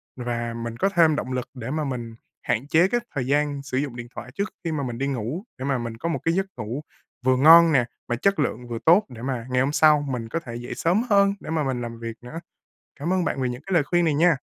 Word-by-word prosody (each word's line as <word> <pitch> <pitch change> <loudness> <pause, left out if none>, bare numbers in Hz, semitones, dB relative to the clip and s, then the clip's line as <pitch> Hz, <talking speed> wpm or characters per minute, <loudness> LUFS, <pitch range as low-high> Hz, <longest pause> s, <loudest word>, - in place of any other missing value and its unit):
và 120 -2 -3
mình 115 0 -5
có 195 - +2
thêm 165 -5 +4
động 130 - -3
lực 125 0 -3
để 125 -1 -6
mà 155 +1 -1
mình 120 -5 -4 0.3
hạn 120 +5 -1
chế 165 +4 +4
cái 240 +5 +1 0.2
thời 130 -3 -1
gian 145 0 +1
sử 130 -2 -3
dụng 135 -3 -2
điện 120 -1 -7
thoại 120 +1 -8
trước 200 -1 -1
khi 165 - -2
mà 150 -3 -2
mình 120 -3 -4
đi 135 +2 -1
ngủ. 135 - -3
Để 130 - -5
mà 135 -1 +1
mình 115 -2 -5
có 165 - -3
một 165 - -1
cái 165 - +2
giấc 190 +2 +1
ngủ 120 +7 -4 0.4
vừa 130 0 +4
ngon 165 +4 +8
nè, 130 -5 +3 0.2
mà 120 - 0
chất 195 +9 +1
lượng 125 -4 -1
vừa 120 -1 -4
tốt, 180 +6 +6
để 120 -3 -10
mà 125 -2 -3
ngày 125 0 +2
hôm 135 +2 +1
sau 150 -1 +5
mình 115 -3 -4
có 165 - -1
thể 120 -8 -8
dậy 120 +1 -6
sớm 180 +7 +2
hơn 200 -1 +5
để - - -10
mà 160 -1 0
mình 130 -3 -2
làm 115 -1 -6
việc 115 -1 -5
nữa. 125 +7 -7 0.6
Cảm 165 +5 -1
ơn 185 -1 +1
bạn 135 - -1
vì 130 - +1
những 125 0 -5
cái 195 - -5
lời 165 - +5
khuyên 175 +3 +2
này 160 -3 +2
nha. 165 +2 +4
135 Hz, 275 wpm, -24 LUFS, 120-165 Hz, 0.6 s, ngon